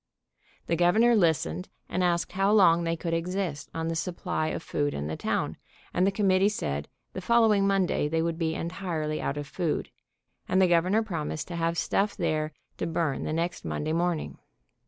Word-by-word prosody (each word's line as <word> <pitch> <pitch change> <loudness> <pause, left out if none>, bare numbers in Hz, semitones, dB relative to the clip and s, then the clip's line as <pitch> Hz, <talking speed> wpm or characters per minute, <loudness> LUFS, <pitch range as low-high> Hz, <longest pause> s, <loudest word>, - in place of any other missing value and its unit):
The 170 - 0
Governor 215 +8 +4
listened, 145 - +1 0.2
and 180 - -1
asked 175 -1 +1
how 195 +2 +2
long 170 -5 +5
they 165 0 0
could 165 0 -3
exist 170 -3 -2
on 165 0 -3
the 165 - -1
supply 170 0 -2
of 155 - -3
food 145 -1 -1
in 70 - -3
the 80 +1 -3
town, - - -2 0.4
and 180 +2 +3
the - - +3
committee 195 -1 +3
said 75 - -3 0.3
the 185 - -5
following 220 -2 +4
Monday 195 -6 +1
they 160 +2 0
would 165 0 -2
be 160 -1 0
entirely 165 -3 -3
out 140 - -2
of 145 - -3
food, 165 +3 -2 0.6
and 185 - +3
the 190 - +5
Governor 180 +6 +3
promised 160 -6 -4
to 175 - -4
have 165 0 0
stuff 200 +4 0
there 155 0 0 0.3
to - - -2
burn 160 -4 -1
the - - -2
next 170 +2 -2
Mon 80 - -3
day 155 +1 -1
morning. 170 -1 -1
170 Hz, 190 wpm, -27 LUFS, 155-190 Hz, 0.6 s, long